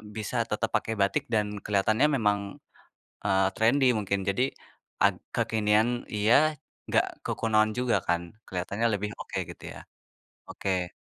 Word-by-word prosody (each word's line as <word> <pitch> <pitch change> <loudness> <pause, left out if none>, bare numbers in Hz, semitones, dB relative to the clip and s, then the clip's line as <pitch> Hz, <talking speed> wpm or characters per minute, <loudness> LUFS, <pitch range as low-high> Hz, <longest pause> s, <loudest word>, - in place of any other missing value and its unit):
bisa 110 -2 -4
tetap - - -1
pakai 110 - 0
batik 100 - +2
dan 105 -1 +3 0.2
kelihatannya 105 +6 +2
memang, 105 -5 +2 0.9
eee, 95 0 +3
trendi 130 +5 +3
mungkin, 100 -1 -1
jadi 100 +6 +1 0.6
ag - - +5 0.2
kekinian 110 0 +2 0.3
iya, 105 +2 +3 0.6
gak - - +4 0.2
kekunoan 110 -1 +2
juga 125 -1 +2
kan, 85 -1 +2 0.3
kelihatannya 100 +5 -2
lebih 105 +1 -2
oke - - -5
gitu - - -12
ya. - - -10 0.7
Oke 90 -2 -2
105 Hz, 130 wpm, -28 LUFS, 100-110 Hz, 0.9 s, ag